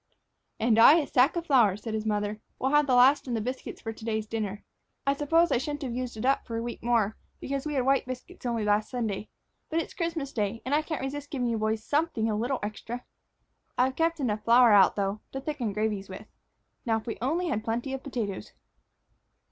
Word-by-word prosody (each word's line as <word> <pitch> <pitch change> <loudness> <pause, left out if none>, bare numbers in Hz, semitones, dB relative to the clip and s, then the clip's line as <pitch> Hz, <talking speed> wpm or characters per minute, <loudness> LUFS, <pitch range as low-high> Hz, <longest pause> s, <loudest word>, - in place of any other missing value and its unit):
"And 225 0 +3
I 275 +6 +9
a 325 -3 +2
sack 265 +5 +3
of 340 -1 -2
flour," 235 - +4
said 220 +1 -6
his 220 0 -2
mother. 210 0 -1 0.2
"We'll 265 - 0
have 295 0 +4
the 255 - +3
last 265 +3 +5
in 245 - -1
biscuits 255 +3 -5
for 225 - -5
to 220 - -14
day's 220 -1 -1
dinner. 210 -2 -4 0.4
I 275 - +3
suppose 325 +4 +2
I - - +3
shouldn't 290 +2 -4
have 250 -3 -3
used 250 -2 -4
it 215 - -3
up 270 +1 +2
for 230 -2 -3
a - - -2
week 240 0 -6
more, 230 -3 +1 0.2
because 275 +2 -3
we 300 - -3
had 255 -2 +1
white 270 -1 +2
biscuits 255 0 -8
only 230 -2 -1
last 210 +1 +2
Sunday. 215 -5 -3 0.4
But 320 - -2
it 330 - -1
is - - -15
Christmas 330 -5 -3
day; 210 0 -1
I 290 +4 +2
can't 315 0 -4
resist 285 +1 -5
giving 250 -4 -1
you 230 -1 -1
boys 215 0 -1
something 290 -5 0
a 215 - 0
little 245 +5 -1
extra. 225 +4 -5 0.7
I've 260 +1 +2
kept 330 0 +1
enough 215 -6 -1
flour 235 +1 +6
out, 200 -2 +6
though, 200 +1 -1
to 270 - -3
thicken 270 -6 -3
gravies 210 -1 -2
with. 190 +3 -8 0.6
Now, 225 -2 +1
if 220 - -7
we 230 - -5
only 330 +8 0
had 215 -5 -1
plenty 240 +4 -2
of 270 - -4
potatoes." 230 -9 -4
240 Hz, 220 wpm, -28 LUFS, 215-275 Hz, 0.7 s, I